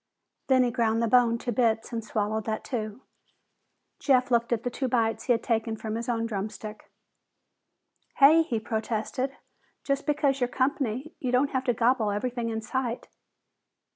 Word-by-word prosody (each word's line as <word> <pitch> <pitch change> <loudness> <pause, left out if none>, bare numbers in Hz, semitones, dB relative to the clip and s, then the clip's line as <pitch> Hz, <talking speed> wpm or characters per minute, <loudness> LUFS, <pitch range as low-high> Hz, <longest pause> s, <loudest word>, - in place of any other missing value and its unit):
Then 260 -1 +5
he 245 - +1
ground 230 -2 +1
the 230 - +1
bone 235 0 +4
to 240 - -3
bits 225 -1 +1
and 230 -1 -2
swallowed 215 0 -2
that 220 -1 -2
too. 220 -1 -5 1.0
Jeff 255 -3 +2
looked 235 0 +2
at 230 -2 0
the 245 - -2
two 260 +2 -2
bites 230 -3 0
he - - +1
had 230 -1 +2
taken 225 -1 -1
from 215 0 -5
his 230 +2 -3
own 230 -1 0
drumstick. 210 0 -6 1.3
"Hey!" 300 +4 +7
he 245 -9 -1
protested. 225 +4 -3 0.5
"Just 275 0 -1
because 280 -2 +1
you're 245 - +3
company, 260 +1 -1
you 255 - -2
don't 260 +3 +2
have 260 -1 -1
to 245 - +2
gobble 230 -1 +2
everything 235 +3 -2
in 220 -1 -3
sight!" 245 0 -3
235 Hz, 170 wpm, -27 LUFS, 220-255 Hz, 1.3 s, Hey